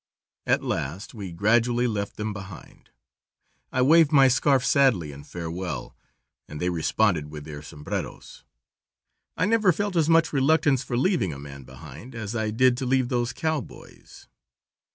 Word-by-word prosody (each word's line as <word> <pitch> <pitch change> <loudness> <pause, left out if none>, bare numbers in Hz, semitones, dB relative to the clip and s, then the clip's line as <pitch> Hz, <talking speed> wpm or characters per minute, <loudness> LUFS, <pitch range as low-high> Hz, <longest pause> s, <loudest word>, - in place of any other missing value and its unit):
At - - +2
last 80 +10 -4
we 100 -6 -7
gradually 120 +7 +2
left 105 -4 -2
them 105 0 -3
behind. 95 -3 -11 0.8
I 125 - +1
waved 160 +2 +5
my 135 -3 +6
scarf 135 +1 +2
sadly 115 - +3
in 70 0 -11
farewell, 85 +3 -6 0.5
and 75 - -8
they 90 +2 0
responded 85 -1 0
with 75 -1 -9
their 75 -2 -8
sombreros. 75 0 -7 0.9
I 180 - +2
never 215 -2 +3
felt 205 +3 -2
as 160 -2 +2
much 165 -1 +3
reluctance 145 -1 +3
for 120 -3 -3
leaving 125 - +1
a - - -8
man 70 -1 -10
behind 85 - -12
as 110 0 -5
I 110 -1 -1
did 120 +3 +3
to 130 - -3
leave 130 -1 +1
those 120 -1 0
cowboys. 160 -5 -6
115 Hz, 155 wpm, -25 LUFS, 85-135 Hz, 0.9 s, my